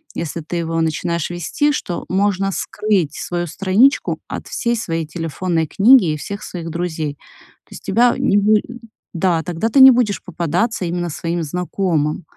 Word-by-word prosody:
если 170 +1 -4
ты 165 +3 -5
его 165 -1 -1
начинаешь 170 +1 -1
вести, 235 +12 0
что 175 -11 -4
можно 195 0 +1
скрыть 190 -6 -1
свою 175 0 -3
страничку 200 - +2
от - - -6
всей 235 0 -1
своей 165 -8 -3
телефонной 165 +1 -2
книги 205 - +5
и - - -4
всех 200 +7 -7
своих 170 -2 -6
друзей. 160 -3 -3 0.5
То - - -34
есть - - -11
тебя 240 +5 +3
не 200 - +2
буде 210 +1 +3 0.5
да, 170 -2 +1
тогда 175 +5 -2
ты 270 +3 +5
не 265 - +11
будешь 235 -5 0
попадаться 180 +5 -1
именно 175 0 -2
своим 170 +2 -3
знакомым, 170 -1 -1
175 Hz, 160 wpm, -19 LUFS, 165-205 Hz, 0.5 s, не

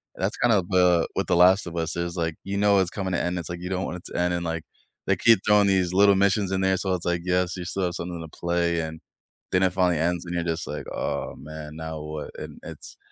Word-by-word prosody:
That's - - -2
kinda 115 -5 +3
the 90 -2 +4
what - - -1
The 90 - +2
Last 90 +1 +5
of 85 - -7
Us 80 0 -2
is, 85 +1 -3
like, 80 -2 -1
you 100 +1 -3
know 100 -1 +4
it's 95 -2 +1
coming 95 -2 -3
to - - +1
end, 90 0 -1
it's, 85 - -7
like, 85 0 -6
you 90 - -5
don't 95 0 -1
want 90 - -4
it 85 - -15
to - - -2
end, 90 0 +1
and 85 - -2
like, 85 -1 -3 0.4
they - - +2
keep 115 -4 +5
throwing 105 -1 +5
these 95 -2 +2
little 100 +1 +6
missions 100 0 +2
in 95 - 0
there, 95 0 +3
so 95 0 -1
it's, 90 - -6
like, 85 -1 0
yes, 90 0 0
you 90 - -5
still 95 +2 -2
have 90 -1 -1
something 85 0 -5
to 80 -1 -11
play 85 -1 0
and 80 0 -6 0.5
then 95 0 +3
it 95 - +3
finally 90 -2 +2
ends, 85 +1 0
and 85 0 -4
you're 85 - 0
just, 85 -1 -3
like, - - -5
"Aw, - - -3
man, 75 0 -9
now 80 -1 -5
what," 75 0 -6
and - - -8
it's - - -10
90 Hz, 270 wpm, -25 LUFS, 85-95 Hz, 0.5 s, little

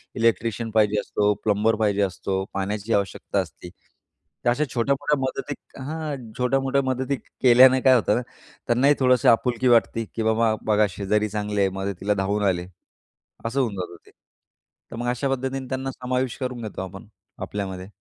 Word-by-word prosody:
Electrician 115 0 0
पाहिजे 105 -1 +3
असतो, 105 0 +1
plumber 105 +1 +2
पाहिजे 105 -2 +1
असतो, 95 0 -1
पाण्याची 100 +3 -2
आवश्यकता 100 -2 -1
असते. 90 - -6 0.8
तर 120 - +5
अशा 125 +5 +2
छोट्या-मोठ्या 140 +4 +1
मदतीत 135 +2 -5
हां 155 -2 -3 0.2
छोट्या-मोठ्या 135 +2 +1
मदतीत 130 +1 -1 0.2
केल्याने 130 +1 +7
काय 130 -1 +6
होतं 105 -3 +2
ना, 125 - 0 0.5
त्यांनाही 130 +5 +4
थोडंसं 125 -1 +4
आपुलकी 125 +2 +2
वाटते, 115 -1 +3
की 115 - -1
बाबा 110 0 +2 0.2
बघा 105 0 +4
शेजारी 105 +3 0
चांगली 105 0 -2
आहे, 95 - +3
मदतीला 100 +1 -1
धावून 105 +2 0
आले 90 -1 0 0.8
असं 115 +4 -1
होऊन 115 -5 -1
जात 90 -2 -5
ते. - - -19 0.8
तर - - -6
मग 120 +1 -3
अशा 125 +3 -1
पद्धतीने 135 0 -2
त्यांना 130 0 -3
समावेश 125 0 -2
करून 125 -2 -3
घेतो 105 -3 -5
आपण 95 +3 -8 0.4
आपल्यामध्ये. 95 -2 -5
115 Hz, 155 wpm, -24 LUFS, 105-130 Hz, 0.8 s, केल्याने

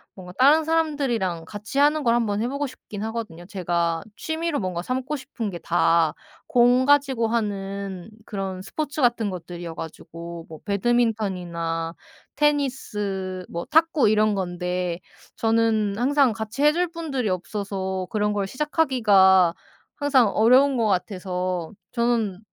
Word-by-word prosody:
뭔가 180 -2 -10
다른 290 +5 +6
사람들이랑 275 - 0
같이하는 280 +9 +1
걸 230 - +3
한번 215 -3 0
해보고 280 +5 -2
싶긴 215 -5 -9
하거든요. 220 -7 -5
제가 170 -3 -1
취미로 320 -1 -2
뭔가 180 -3 -3
삼고 255 +8 -2
싶은 260 -5 -5
게 175 -3 -6
다 165 -2 +2 0.3
공 245 +1 +4
가지고 275 -5 +3
하는 200 -3 -3
그런 195 -2 -4
스포츠 300 +8 -4
같은 235 -4 +2
것들이어 175 -1 -7
가지고 165 +1 -8
뭐 160 -1 -10
배드민턴이나 190 -7 -1 0.4
테니스 210 -10 -1
뭐 170 0 -4
탁구 320 -3 +3
이런 215 0 +3
건데 180 -1 -2 0.4
저는 225 -2 +1
항상 270 +1 +3
같이 220 +4 -5
해줄 335 +4 +3
분들이 290 - -2
없어서 190 0 -3
그런 210 -1 0
걸 200 -1 -1
시작하기가 205 - +3 0.4
항상 275 -5 +3
어려운 255 +6 +4
것 230 - +2
같아서 180 -3 -2 0.2
저는 235 -6 0
210 Hz, 290 characters per minute, -24 LUFS, 185-260 Hz, 0.4 s, 다른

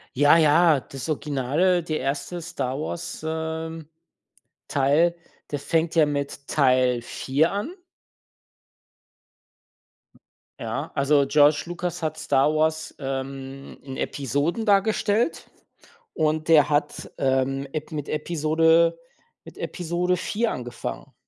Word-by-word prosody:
Ja, 145 +4 +6
ja, 160 -1 +5
das 135 +1 -8
Original, 155 +4 +1
der 155 -1 -2
1. 145 +6 -3
Star 135 -5 -4
Wars, 160 +1 -5
ähm, 160 0 -4 0.8
Teil, 145 +5 +2 0.4
der 145 - -2
fängt 165 +3 0
ja 160 -3 +4
mit 140 -1 -4
Teil 130 -3 +3
4 140 +7 0
an 205 - -3 2.9
Ja, - - -4
also 140 0 +3
George 145 +1 +4
Lucas 175 -1 -4
hat 155 0 -2
Star 150 -1 +2
Wars, 160 0 0
ähm, 135 0 -6
in 135 -1 -8
Episoden 145 - -2
dargestellt, 210 - +1 0.6
und 155 +1 0
der 150 -3 +6
hat, 145 0 -1
ähm, 135 0 0
ep 155 +1 -5
mit 150 -2 -4
Episode 165 +1 +2 0.5
mit - - -13
Episode 180 +1 -1
4 220 +5 -1
angefangen. 120 -1 -6
155 Hz, 110 wpm, -24 LUFS, 140-165 Hz, 2.9 s, Ja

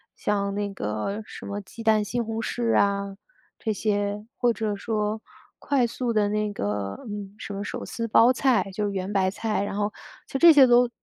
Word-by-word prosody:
像 200 -1 -1
那 205 -1 -2
个 110 - -3
什 - - -10
么 200 0 -4
鸡 205 +3 -10
蛋 220 -1 +4
西 240 +3 -1
红 225 -1 -4
柿 235 0 0
啊， 200 -1 +1 0.4
这 220 - -1
些， 205 0 -1
或 245 -1 +3
者 215 -1 -2
说 215 +1 -2 0.4
快 265 -4 +1
速 240 +1 -2
的 215 -2 +2
那 210 0 0
个 100 - -3
嗯， 205 -2 -6
什 200 - -6
么 200 +1 -4
手 - - -5
撕 230 -1 -4
包 230 +2 +6
菜， 250 -5 +2
就 210 +2 -1
是 205 - -1
圆 190 0 -3
白 190 -1 +2
菜， 215 0 -1
然 200 - -4
后 205 0 0 0.4
就 - - -3
这 340 +2 +9
些 280 -4 +8
都， 245 0 +5
210 Hz, 210 characters per minute, -25 LUFS, 200-230 Hz, 0.4 s, 这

